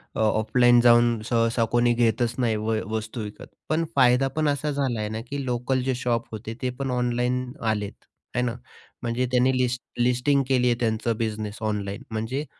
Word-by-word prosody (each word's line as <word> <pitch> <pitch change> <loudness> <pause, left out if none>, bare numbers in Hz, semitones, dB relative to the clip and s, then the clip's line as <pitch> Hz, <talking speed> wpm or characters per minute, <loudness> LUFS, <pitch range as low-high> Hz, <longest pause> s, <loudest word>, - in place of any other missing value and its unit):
अ, - - -3
offline 120 +3 +4
जाऊन 120 -2 +5
सहसा 115 0 +2
कोणी 120 0 +3
घेतच 120 0 +1
नाही 115 -3 +1
व 110 +1 -1 0.2
वस्तू 110 +2 -4
विकत. 105 0 -9 0.2
पण 160 +2 +1
फायदा 130 0 +4
पण 155 -1 +2
असा 145 +1 -1
झाला 135 -5 -1
आहे 105 0 -2
ना, 110 +1 -4
की 140 -1 -3
लोकल 125 +1 0
जे 130 -1 0
शॉप 120 -1 -1
होते 110 0 -6
ते 130 - 0
पण 135 -1 -2
ऑनलाईन 125 +1 0
आलेत. 105 -3 -1 0.4
आहे 125 - +2
ना? 120 -1 -2 0.5
म्हणजे 120 +1 -1
त्यांनी 130 +1 +3
लिस्ट 125 -1 0 0.2
लिस्टिंग 125 +3 +2
केली 125 -2 +2
आहे 120 - +3
त्यांचा 115 0 0
बिझनेस 105 -1 -4
ऑनलाईन. 105 -1 -3
म्हणजे 115 +7 -3
120 Hz, 180 wpm, -25 LUFS, 110-125 Hz, 0.5 s, जाऊन